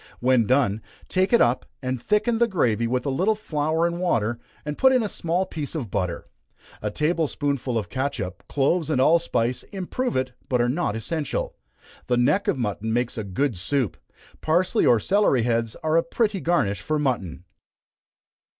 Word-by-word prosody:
When 125 -3 +3
done, 120 -5 +2 0.3
take 185 +1 +1
it 235 - +5
up, 120 +2 +2
and 130 -2 -3
thicken 225 +2 +1
the 235 - +4
gravy 120 - +1
with 125 +1 -1
a 140 - 0
little 190 +11 +2
flour 160 -4 0
and 170 0 -1
water, 120 -10 0 0.3
and 150 0 -3
put 265 - +5
in 255 -3 +3
a - - -1
small 175 -1 -1
piece 155 -4 -5
of 125 -11 -4
butter. 90 -2 -2 0.6
A 105 - -1
table 155 +7 0
spoonful 140 -4 -2
of 105 -4 -2
catsup, 120 -9 -3
cloves 155 +4 +1
and 145 -5 +1
allspice, 130 -5 +2
improve 205 +6 -3
it, 130 0 0 0.2
but 125 - +2
are 120 - +3
not 135 -5 -1
essential. 145 +6 -3 0.5
The 125 - +2
neck 150 +11 +2
of - - +1
mutton 110 -2 -2
makes 120 +1 0
a 110 - -3
good 100 +2 -1
soup. 125 +2 0 0.5
Parsely 170 +4 +2
or 120 - +5
celery 185 - +2
heads 115 -1 0
are 160 +1 +2
a - - +5
pretty 205 +3 0
garnish 165 - +1
for 155 - -1
mutton. 120 - -2
140 Hz, 175 wpm, -24 LUFS, 115-170 Hz, 0.6 s, it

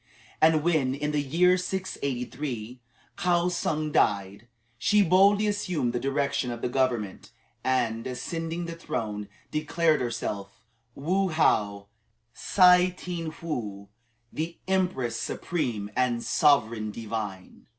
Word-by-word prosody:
And 160 -1 +5
when, 150 -6 +2
in 150 +1 -2
the 150 -1 +1
year 175 +6 +3
683, 130 - -4 0.4
Kaou 175 0 +2
tsung 155 -3 -1
died, 100 -5 +1 0.3
she 210 - +4
boldly 200 +4 +5
assumed 180 - -1
the 120 - 0
direction 140 -1 0
of 120 -1 -6
the - - 0
government, 120 -6 -1 0.3
and, 120 -3 0
ascending 165 +6 -4
the 170 - -5
throne, 105 -10 -4 0.2
declared 155 0 +1
herself 100 -5 -4 0.4
Woo 185 +7 +1
How 105 -11 +1 0.5
Tsih 180 -1 +5
tien 170 -3 -4
Woo 105 -11 -4 0.4
the 165 +2 -4
Empress 180 -12 0
Supreme 120 -13 -3
and 125 -2 +1
Sovereign 115 -8 +2
Divine. 105 -4 -6
140 Hz, 115 wpm, -27 LUFS, 115-170 Hz, 0.5 s, And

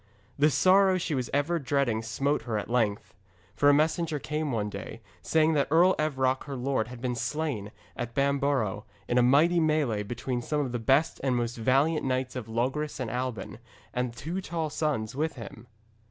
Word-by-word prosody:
The 150 +2 +5
sorrow 190 +4 +4
she 165 -3 -2
was 130 -3 -2
ever 150 +4 +1
dreading 135 -5 0
smote 135 +6 -1
her 110 - 0
at 105 - -5
length. 110 -4 0 0.4
For 145 +6 +4
a - - +6
messenger 155 +1 +1
came 150 +1 -3
one 105 -3 -1
day, 100 +2 -7 0.2
saying 160 - +2
that 145 -2 +2
Earl 175 +5 +5
Evroc 130 -4 0
her 140 -2 -5
lord 125 -3 -1
had 120 -1 -10
been 125 -1 -1
slain 120 -6 -3 0.2
at 120 -1 -5
Bamborough, 140 -6 0 0.2
in 120 - +2
a - - +5
mighty 150 +8 +4
melée 150 -9 +1
between 120 +2 -3
some 150 +4 -1
of 135 -4 -3
the 120 - -2
best 135 +8 +2
and 130 -2 +1
most 120 -1 -1
valiant 135 +7 +2
knights 130 -1 -1
of 125 -4 -5
Logres 135 +7 -2
and 125 -3 -3
Alban, 125 -4 -4 0.3
and 125 -1 -1
two 165 +10 -4
tall 165 -4 -3
sons 135 -9 -2
with 160 +3 -1
him. 120 0 -10
135 Hz, 185 wpm, -28 LUFS, 120-155 Hz, 0.4 s, a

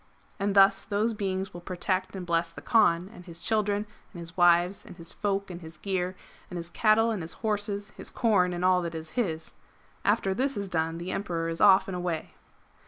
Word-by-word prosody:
And 200 0 0
thus 195 0 +6
those 215 +3 0
beings 195 -2 -3
will 175 - -8
protect 185 +2 -2
and 185 -2 -5
bless 170 0 +1
the 165 - -11
Kaan 185 -6 +3
and 180 - -12
his 170 -1 -9
children 210 -1 +1 0.3
and 175 - -10
his 170 +1 -8
wives 175 +1 +4
and - - -12
his 170 -1 -7
folk 200 -1 -2
and 175 0 -8
his 160 -1 -11
gear, 185 +1 -2 0.3
and 180 - -6
his 170 0 -7
cattle 225 +2 +3
and 210 -5 -2
his 160 - -5
horses, 205 -1 -1
his - - -7
corn 200 -7 +2
and 175 +1 -2
all 185 -1 +4
that 170 -1 -4
is 160 -1 -7
his. 165 -10 -2 0.5
After 195 - +2
this 265 +5 0
is 200 -1 -3
done, 165 -2 -1
the 175 +2 -5
Emperor 170 -5 -2
is 165 - -3
off 195 -2 +6
and 190 - -4
away.'' 175 -3 -3
185 Hz, 210 wpm, -28 LUFS, 170-205 Hz, 0.5 s, thus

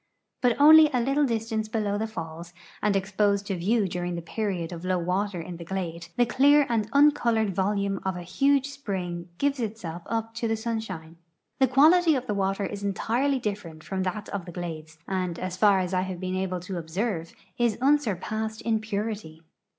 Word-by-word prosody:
But 245 -2 +3
onl3'^ 310 +1 +8
a - - +3
little 275 +4 +2
distance 225 -2 -2
below 210 -2 -1
the 220 +2 -1
falls, 170 -3 -7 0.3
and 210 -1 +2
e.\i)Osed 200 +1 +1
to 195 - -2
view 200 +4 +1
during 175 0 -3
the 170 - -5
period 185 -3 -3
of 170 -1 -7
low 185 0 +1
water 180 +2 -1
in 170 +1 -7
the 170 - -8
glade, 170 -2 -4
the 245 - +5
clear 280 +4 +5
and 220 -3 0
uncolored 240 -7 +3
volume 200 +1 0
of 190 -1 -2
a 175 - -6
huge 275 +9 +2
spring 180 -10 -5
gives 280 -1 0
itself 205 -7 -4
up 225 0 -2
to 230 0 -2
the 225 - +1
sunshine. 215 -8 -5 0.4
The 265 - +5
quality 315 +6 +5
of 255 -1 -2
the 210 - -1
water 195 0 0
is 200 +1 -6
entirely 240 +8 0
different 200 -9 -5
from 190 -1 -3
that 205 +3 -3
of 195 -4 -4
the 175 - -8
glades, 160 -3 -7
and, 185 -3 -2
as 185 -1 -4
far 200 0 +5
as 185 0 -1
I 185 - +2
have 185 -1 -4
been 185 0 -3
able 185 -1 -2
to 180 0 -5
observe, 170 +1 -3 0.2
is 235 -3 +2
unsurpassed 220 -5 0
in 225 -1 +1
purity. 205 -6 -4
200 Hz, 190 wpm, -26 LUFS, 180-230 Hz, 0.4 s, onl3'^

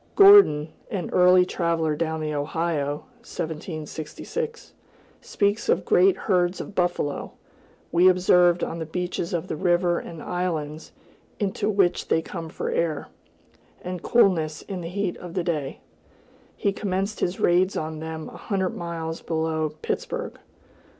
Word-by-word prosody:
Gordon, 395 - +8 0.2
an 190 -5 -4
early 180 0 +6
traveler 165 -4 0
down 160 0 -2
the 155 0 -2
Ohio 150 -1 -2 0.2
(1766), 160 - -6 0.5
speaks 205 +2 0
of 180 - +2
"great 185 +1 +4
herds 180 -2 +1
of - - -7
buffalo, 175 -6 -1 0.6
we 175 +2 +5
observed 180 -1 +4
on 170 - -3
the 160 - -4
beaches 175 0 -3
of 170 -2 -2
the - - -3
river 175 +1 +2
and 165 -3 -9
islands 160 -4 -3 0.5
into 205 0 -1
which 195 -4 +2
they - - +3
come 165 -1 -6
for - - -4
air, 160 -3 -1 0.7
and 180 -1 -5
coolness 165 -10 +2
in 190 -3 -6
the 165 - -5
heat 195 0 -2
of 175 -1 -9
the 180 - 0
day;" 150 -6 -3 0.8
he 200 - 0
commenced 195 0 -2
his 180 +1 -1
raids 180 +2 +3
on 155 0 -4
them 160 0 -6
a - - -11
hundred 190 -3 -2
miles 165 -1 -5
below 160 -1 -1
Pittsburg. - - -3
175 Hz, 140 wpm, -25 LUFS, 160-185 Hz, 0.8 s, Gordon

